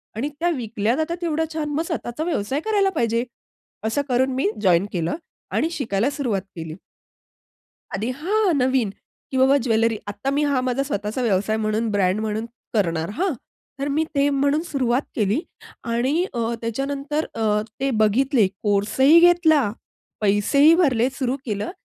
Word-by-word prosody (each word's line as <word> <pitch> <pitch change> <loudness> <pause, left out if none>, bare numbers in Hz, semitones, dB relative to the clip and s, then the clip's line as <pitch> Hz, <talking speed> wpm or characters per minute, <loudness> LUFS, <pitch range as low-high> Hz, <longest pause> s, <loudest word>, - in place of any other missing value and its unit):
आणि 265 +6 -2
त्या 345 +1 +2
विकल्या 225 -1 -1
जाता 320 +3 -1
तेवढ्या 320 -1 0
छान, 305 -2 -2
मग 310 +3 0
स्वतःचा 310 -5 -4
व्यवसाय 280 -5 -1
करायला 410 -3 +2
पाहिजे. 230 0 +1 0.6
असं 225 +6 +1
करून 260 +2 +2
मी 260 -5 +1
जॉइन 185 -2 +4
केलं 170 - -1 0.4
आणि 320 - +1
शिकायला 235 -5 0
सुरुवात 245 -9 -1
केली. 160 -1 -6 1.2
आधी 220 +5 -2
हां, 365 +12 0
हां 350 - +3
नवीन, 255 -5 +2 0.4
की 265 - -3
बाबा 265 +2 +5
ज्वेलरी 225 -1 +2
आता 205 +7 -3
मी 285 +2 +1
हा 275 -3 +2
माझा 250 +2 0
स्वतःचा 210 +1 -2
व्यवसाय 215 -1 +1
म्हणून 215 +2 0
ब्रँड 195 0 +1
म्हणून 220 0 -2 0.3
करणार 170 -5 0
हां. 380 0 +1 0.5
तर 280 - -1
मी 300 +3 +1
ते 280 0 +3
म्हणून 280 +2 +2
सुरुवात 265 -5 0
केली 215 +6 +1 0.5
आणि 270 +9 +1
अ, 235 0 -1
त्याच्यानंतर 275 +6 -2
अ, 215 -2 +1 0.2
ते 270 0 +1
बघितले 225 +1 +3
कोर्स 205 +3 -1
ही 295 +5 +8
घेतला, 345 -4 +5 0.6
पैसेही 220 +10 +4
भरले 260 -9 +3
सुरू 260 -1 -2
केलं. 210 -2 -3
250 Hz, 155 wpm, -22 LUFS, 215-290 Hz, 1.2 s, ही